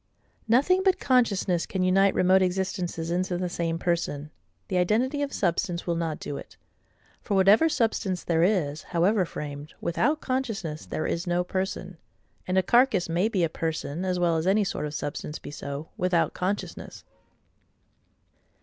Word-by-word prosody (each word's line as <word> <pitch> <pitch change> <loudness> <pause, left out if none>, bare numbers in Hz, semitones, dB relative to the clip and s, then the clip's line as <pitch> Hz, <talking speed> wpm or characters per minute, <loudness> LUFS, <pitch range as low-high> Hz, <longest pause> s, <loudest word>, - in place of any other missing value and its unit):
Nothing 285 +12 +4
but 380 -2 +2
consciousness 205 -9 +2
can 190 -1 -1
unite 195 +2 +4
remote 185 +1 +4
existences 180 -3 -1
into 180 0 0
the 180 0 -1
same 165 -1 -2
person: 165 -4 -2 0.4
the 185 - -1
identity 240 +10 +1
of 285 -1 -1
substance 175 -1 -1
will 170 - 0
not 165 -2 -2
do 140 - -5
it; - - -11 0.6
for 205 - -2
whatever 200 +12 +5
substance 220 - 0
there 165 -1 +1
is, 165 -6 +1
however 185 +3 +1
framed, 145 -1 -7
without 290 - +1
consciousness 225 - -3
there 155 - -3
is 170 +2 -2
no 175 0 +1
person: 185 -1 -4 0.5
and 185 +1 0
a 190 - +4
carcass 235 -5 +3
may 175 +6 +1
be 190 -6 0
a - - +3
person, 160 0 -3
as 185 -1 0
well 170 -2 +2
as 160 +3 -1
any 205 +2 +4
sort 185 -5 -2
of 150 - -7
substance 145 +1 -4
be - - -9
so, 140 +1 -6
without 180 -2 +1
consciousness. 195 +3 -4
180 Hz, 160 wpm, -26 LUFS, 165-200 Hz, 0.6 s, whatever